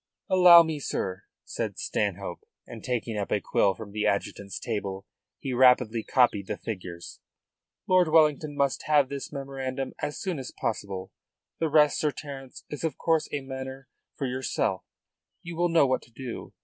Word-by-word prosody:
"Allow 180 Hz, -2 st, +9 dB
me, 160 Hz, -2 st, -3 dB
sir," 95 Hz, -7 st, -3 dB, 0.2 s
said -, -, -4 dB
Stanhope, 100 Hz, -3 st, -2 dB, 0.3 s
and -, -, -10 dB
taking 115 Hz, -3 st, -2 dB
up 100 Hz, -, -4 dB
a 105 Hz, -, +2 dB
quill 100 Hz, 0 st, +2 dB
from 110 Hz, -3 st, -9 dB
the 105 Hz, +1 st, 0 dB
adjutant's 100 Hz, -1 st, -2 dB
table 100 Hz, -4 st, -4 dB, 0.3 s
he 135 Hz, -, -4 dB
rapidly 125 Hz, -2 st, +4 dB
copied 115 Hz, -7 st, +2 dB
the -, -, -3 dB
figures. 90 Hz, -5 st, -7 dB, 0.7 s
"Lord 185 Hz, -2 st, +5 dB
Wellington 155 Hz, -2 st, +3 dB
must 140 Hz, -2 st, 0 dB
have 145 Hz, -3 st, +4 dB
this 140 Hz, -1 st, -5 dB
memorandum 135 Hz, -2 st, -4 dB
as 145 Hz, -, -3 dB
soon 185 Hz, -6 st, -3 dB
as 130 Hz, -, -6 dB
possible. 100 Hz, -3 st, -3 dB, 0.5 s
The 160 Hz, -, +1 dB
rest, 150 Hz, -1 st, +4 dB
Sir 150 Hz, -, +2 dB
Terence, 135 Hz, -3 st, -9 dB
is 150 Hz, -, -7 dB
of 160 Hz, -, -1 dB
course 165 Hz, -2 st, +1 dB
a 145 Hz, -, -2 dB
matter 130 Hz, 0 st, -7 dB, 0.3 s
for 140 Hz, -, -2 dB
yourself. 130 Hz, -1 st, -1 dB, 0.6 s
You 170 Hz, 0 st, -7 dB
will 175 Hz, +1 st, +1 dB
know 165 Hz, -3 st, +5 dB
what 130 Hz, -1 st, +1 dB
to 120 Hz, -, -19 dB
do. 120 Hz, 0 st, -7 dB
130 Hz, 165 wpm, -27 LUFS, 105-150 Hz, 0.7 s, Allow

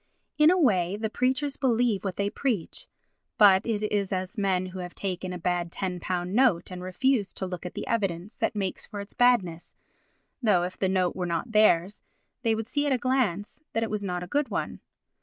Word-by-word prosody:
In 300 Hz, +1 st, +7 dB
a 365 Hz, -, +4 dB
way 195 Hz, -, +2 dB
the 220 Hz, 0 st, -3 dB
preachers 265 Hz, +4 st, 0 dB
believe 240 Hz, -5 st, +1 dB
what 190 Hz, -3 st, -3 dB
they 200 Hz, 0 st, -1 dB
preach, 230 Hz, -11 st, -2 dB, 0.5 s
but 195 Hz, -3 st, +7 dB
it 215 Hz, -2 st, -1 dB
is 205 Hz, -2 st, 0 dB
as 185 Hz, +3 st, -3 dB
men 190 Hz, -3 st, +1 dB
who 185 Hz, 0 st, -7 dB
have 180 Hz, -1 st, -7 dB
taken 185 Hz, -1 st, -3 dB
a 180 Hz, -, -4 dB
bad 175 Hz, -1 st, -1 dB
£10 180 Hz, -2 st, -3 dB, 0.3 s
note 210 Hz, -7 st, +3 dB
and 180 Hz, 0 st, -6 dB
refuse 200 Hz, +4 st, 0 dB
to 190 Hz, -, -3 dB
look 180 Hz, -1 st, -5 dB
at -, -, -10 dB
the -, -, -4 dB
evidence 195 Hz, -2 st, -2 dB
that -, -, -1 dB
makes 195 Hz, -3 st, -2 dB
for 205 Hz, -, -7 dB
its 200 Hz, +1 st, -8 dB
badness, 195 Hz, -10 st, +2 dB, 0.7 s
though, 205 Hz, -7 st, +3 dB
if 180 Hz, +1 st, -4 dB
the 190 Hz, -, 0 dB
note 185 Hz, -2 st, +1 dB
were 180 Hz, -1 st, -2 dB
not 170 Hz, +7 st, -2 dB
theirs, 205 Hz, -3 st, +3 dB, 0.4 s
they 225 Hz, -2 st, +2 dB
would 225 Hz, 0 st, -3 dB
see 290 Hz, +5 st, -1 dB
at -, -, +1 dB
a 260 Hz, -, +3 dB
glance 245 Hz, -, -1 dB
that 225 Hz, -, +1 dB
it 225 Hz, -, -3 dB
was 210 Hz, -1 st, -2 dB
not 180 Hz, -2 st, -3 dB
a -, -, -7 dB
good 290 Hz, +4 st, 0 dB
one. -, -, -3 dB
200 Hz, 210 wpm, -27 LUFS, 180-230 Hz, 0.7 s, In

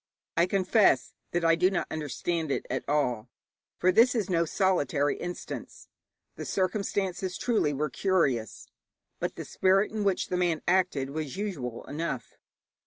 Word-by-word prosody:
I 170 Hz, +2 st, +3 dB
confess 185 Hz, -, +3 dB, 0.2 s
that 175 Hz, -1 st, -1 dB
I 165 Hz, -, +6 dB
do 180 Hz, +3 st, +4 dB
not 190 Hz, -3 st, -1 dB
understand 160 Hz, +1 st, -2 dB
it -, -, -1 dB
at 130 Hz, -, -1 dB
all, 125 Hz, -6 st, 0 dB, 0.5 s
for 185 Hz, -, +3 dB
this 235 Hz, +6 st, +5 dB
is 205 Hz, -4 st, -1 dB
no 170 Hz, -1 st, +3 dB
solitary 150 Hz, -6 st, +1 dB
instance. 175 Hz, 0 st, -7 dB, 0.5 s
The -, -, -5 dB
circumstances, 190 Hz, -1 st, -1 dB
truly, 220 Hz, -11 st, +1 dB
were 145 Hz, +1 st, -2 dB
curious, 135 Hz, -, 0 dB, 0.5 s
but -, -, -2 dB
the -, -, -6 dB
spirit 195 Hz, +2 st, +2 dB
in 215 Hz, -1 st, -2 dB
which 195 Hz, -2 st, 0 dB
the 180 Hz, -, 0 dB
man 175 Hz, -3 st, 0 dB
acted 175 Hz, -7 st, +2 dB
was 155 Hz, +1 st, -4 dB
usual 145 Hz, -, -4 dB
enough. 145 Hz, -5 st, -4 dB
175 Hz, 150 wpm, -28 LUFS, 145-190 Hz, 0.5 s, I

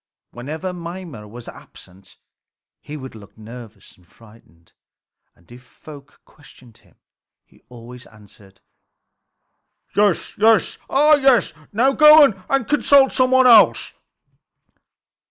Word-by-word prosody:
Whenever 155 Hz, +9 st, -8 dB
Mimer 170 Hz, -, -11 dB
was 120 Hz, +3 st, -14 dB
absent 95 Hz, +1 st, -17 dB, 0.6 s
he 150 Hz, -, -11 dB
would 130 Hz, -2 st, -12 dB
look 105 Hz, -2 st, -17 dB
nervous 110 Hz, -1 st, -15 dB
and 90 Hz, -2 st, -29 dB
frightened, 95 Hz, -7 st, -24 dB, 0.6 s
and 85 Hz, +7 st, -28 dB
if 125 Hz, +1 st, -15 dB
folk 145 Hz, +2 st, -17 dB
questioned 130 Hz, -6 st, -22 dB
him -, -, -30 dB, 0.5 s
he -, -, -28 dB
always 125 Hz, +1 st, -15 dB
answered: 100 Hz, -2 st, -22 dB, 1.3 s
"Yes, 205 Hz, -4 st, -1 dB, 0.6 s
ah 300 Hz, +2 st, +3 dB
yes! 265 Hz, -7 st, +1 dB, 0.2 s
Now 245 Hz, +6 st, 0 dB
go 305 Hz, +1 st, +6 dB, 0.3 s
and 275 Hz, -4 st, -2 dB
consult 285 Hz, -2 st, +2 dB
some 255 Hz, 0 st, 0 dB
one 260 Hz, 0 st, +2 dB
else." 230 Hz, -4 st, +3 dB
140 Hz, 110 wpm, -18 LUFS, -, 1.3 s, go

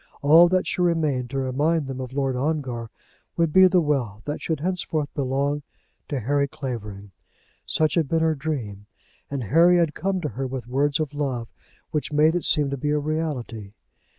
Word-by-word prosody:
All 165 Hz, +4 st, +7 dB
that 185 Hz, 0 st, +1 dB
should -, -, -2 dB
remain 155 Hz, -7 st, +1 dB
to 135 Hz, -, -5 dB
remind 145 Hz, +4 st, 0 dB
them 130 Hz, -1 st, -5 dB
of 130 Hz, -, -6 dB
Lord 135 Hz, -1 st, -1 dB
Ongar 130 Hz, -5 st, -2 dB, 0.5 s
would 165 Hz, -3 st, +1 dB
be 190 Hz, 0 st, +8 dB
the 185 Hz, 0 st, +3 dB
wealth 125 Hz, -9 st, -1 dB
that 150 Hz, -, -4 dB
should 160 Hz, -3 st, -2 dB
henceforth 160 Hz, -4 st, -2 dB
belong 140 Hz, +2 st, -1 dB, 0.5 s
to 140 Hz, -, -2 dB
Harry 140 Hz, +4 st, +1 dB
Clavering. 105 Hz, -8 st, -6 dB, 0.6 s
Such 155 Hz, -1 st, +1 dB
had 165 Hz, -4 st, +1 dB
been 165 Hz, -1 st, +1 dB
her 160 Hz, 0 st, +3 dB
dream, 125 Hz, -9 st, -5 dB, 0.4 s
and 140 Hz, -3 st, -3 dB
Harry 170 Hz, -, +5 dB
had 165 Hz, -3 st, +2 dB
come 190 Hz, +4 st, -1 dB
to 150 Hz, -, -2 dB
her 135 Hz, 0 st, -4 dB
with 130 Hz, -2 st, -5 dB
words 140 Hz, +4 st, 0 dB
of 150 Hz, -2 st, -2 dB
love 130 Hz, -6 st, -3 dB, 0.4 s
which 150 Hz, -1 st, -2 dB
made 150 Hz, +2 st, +4 dB
it 175 Hz, -, -1 dB
seem 145 Hz, -3 st, +3 dB
to 140 Hz, -, -2 dB
be 145 Hz, +3 st, -2 dB
a 150 Hz, -, +2 dB
reality. 145 Hz, -9 st, -3 dB
145 Hz, 185 wpm, -24 LUFS, 130-160 Hz, 0.6 s, be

